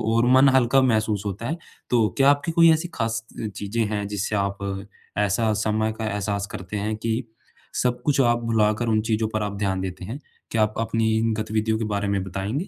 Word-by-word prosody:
और 115 - +4
मन 135 +1 +7
हल्का 130 0 +4
महसूस 110 -5 +1
होता 105 +3 -4
है। 160 - -2 0.3
तो 115 -3 +3
क्या 135 0 +6
आपकी 145 +4 +2
कोई 165 0 +6
ऐसी 160 +2 +1
खास 115 -1 -1
त - - -7
अ, - - -1
चीज़ें 105 +3 -2
हैं 105 -1 -2
जिससे 105 +1 -2
आप 100 -1 -1 0.6
ऐसा 105 +2 +2
समय 110 +1 0
का 110 - -3
एहसास 100 0 -2
करते 95 +3 -5
हैं 105 +2 -2
कि 115 +3 -2 0.6
सब 125 -1 0
कुछ 145 -2 +2
आप 120 -1 +3
भुलाकर 110 0 +1
उन 110 -1 +2
चीज़ों 110 0 +1
पर 110 -1 0
आप 100 -1 -4
ध्यान 95 -2 -1
देते 90 -1 -5
हैं? 120 +8 -6 0.3
क्या 115 - +1
आप 105 0 0
अपनी 115 0 +1 0.3
गतिविधियों 110 0 0
के 110 - -2
बारे 105 -1 -1
में 100 -1 0
बताएँगे? 100 - -3
110 Hz, 210 wpm, -24 LUFS, 105-120 Hz, 0.6 s, मन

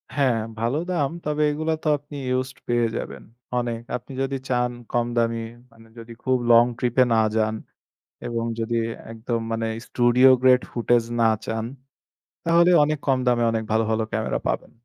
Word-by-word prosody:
হ্যাঁ, 130 -5 +2 0.2
ভালো 120 +5 0
দাম। 145 -6 +1 0.2
তবে 150 0 -1
এগুলো 155 +2 -2
তো - - -2
আপনি 145 +1 -13
ইউজড 130 +1 -2
পেয়ে 120 -1 +2
যাবেন। - - -6 0.4
অনেক। 120 -1 -3 0.2
আপনি 125 - -15
যদি 135 0 -1
চান 125 -1 +1 0.2
কম 120 -1 +1
দামি 115 0 +1 0.3
মানে 115 0 -18
যদি 115 0 -10
খুব 130 0 +2
long 115 +1 +7
trip 120 -1 -1
এ - - +8
না - - +3 0.2
যান 110 0 +1 0.7
এবং 115 -1 -2 0.2
যদি 115 +1 -1 0.4
একদম 115 +1 -3
মানে 115 0 -1 0.2
studio 125 +2 +4
grade 130 -1 +5
footage 120 -1 +2
না 115 - +5 0.2
চান 110 0 -2 0.8
তাহলে 170 +1 +5
অনেক 150 0 0
কম 130 -1 +3
দামে 120 -1 +3
অনেক 110 0 -1
ভালো, 110 0 +3
ভালো 110 0 +1
ক্যামেরা - - -1
পাবেন। - - -2
120 Hz, 170 wpm, -23 LUFS, 115-135 Hz, 0.8 s, এ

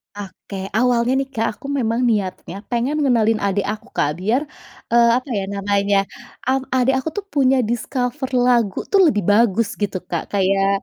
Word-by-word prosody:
Oke 200 0 -9 0.2
awalnya 245 0 +2
nih 270 - -2
Kak 225 - 0
aku - - -9
memang 240 -5 -1
niatnya 195 -4 -2 0.2
pengen 245 +5 0
ngenalin 225 -4 +3
adik 200 0 -1
aku 215 0 -8
Kak 145 - +2
biar, 220 +8 +1 0.5
eee, 235 0 +5
apa 255 - -6
ya 195 - -1
namanya, 200 0 +1 0.5
mmm, 265 0 +1
adik 260 +1 +3
aku 290 - -3
tuh 400 - -10
punya 270 -2 +3
discover 250 +3 -2 0.2
lagu 235 -6 +2
tuh 395 - +5
lebih 205 -4 -1
bagus 225 0 +3
gitu 200 -2 -1
Kak 170 - -2
kayak 195 0 +2
230 Hz, 165 wpm, -20 LUFS, 200-255 Hz, 0.5 s, eee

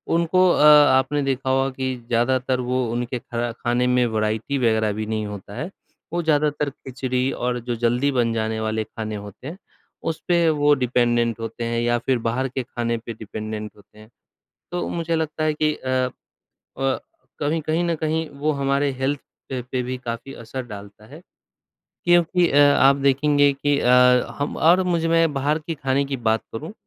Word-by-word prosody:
उनको 170 +2 +3
अ, - - +2
आपने 145 -1 +6
देखा 135 -1 -1
होगा 135 0 +2
कि 130 0 -3
ज़्यादातर 125 +2 +1
वो 125 0 -1
उनके 120 +1 -3
खरा 120 -1 -3
खाने 120 +2 0
में 125 -1 +3
वैराइटी 110 +4 -1
वगैरह 110 -4 +2
भी 110 +1 -4
नहीं 110 0 -2
होता 100 0 -8
है। 155 - -4 0.4
वो 175 - 0
ज़्यादातर 150 -1 +1
खिचड़ी 130 -1 -3
और 125 0 -2
जो 120 0 -3
जल्दी 120 +4 +1
बन 120 -3 +1
जाने 110 0 -2
वाले 110 0 -1
खाने 110 0 -6
होते 105 +5 -9
हैं, 165 +5 -7 0.5
उस 160 - -2
पर 170 -2 +4
वो 145 0 +4
डिपेंडेंट 120 -2 +1
होते 115 +1 -5
हैं 115 0 -1
या 120 0 +2
फिर 130 +1 0
बाहर 130 +3 0
के 130 0 -4
खाने 120 -1 -2
पर 115 0 -7
डिपेंडेंट 110 0 -6
होते 105 +1 -20
हैं। 110 - -15 0.6
तो 175 0 -2
मुझे 165 -1 -1
लगता 155 0 -2
है 155 -1 +1
कि 155 0 +1
अ, 130 -1 -1 0.7
प 135 -1 0 0.4
कभी 155 +2 0
कहीं 160 +3 -1
न 170 -1 0
कहीं, 160 +1 -1
वो 145 +2 -2
हमारे 140 0 0
हेल्थ 140 +1 -1 0.3
पे 130 -2 -3
पे 125 +1 -3
भी 125 +1 -4
काफ़ी 120 +2 -6
असर 130 +3 -5
डालता 105 0 -11
है। 150 +6 -12 0.8
क्योंकि 175 0 +4
अ, 140 - +3
आप 145 -1 +6
देखेंगे 140 +1 +3
कि 140 +1 0
अ, 125 - +2 0.5
हम 145 +1 -2
और 175 +4 +4
मुझ 170 -3 0
मैं 165 -1 +3
बाहर 145 +3 +1
के 160 +1 -5
खाने 135 0 0
की 135 -1 -3
बात 110 -2 +1
करूँ, 155 - -6
130 Hz, 185 wpm, -22 LUFS, 115-145 Hz, 0.8 s, आपने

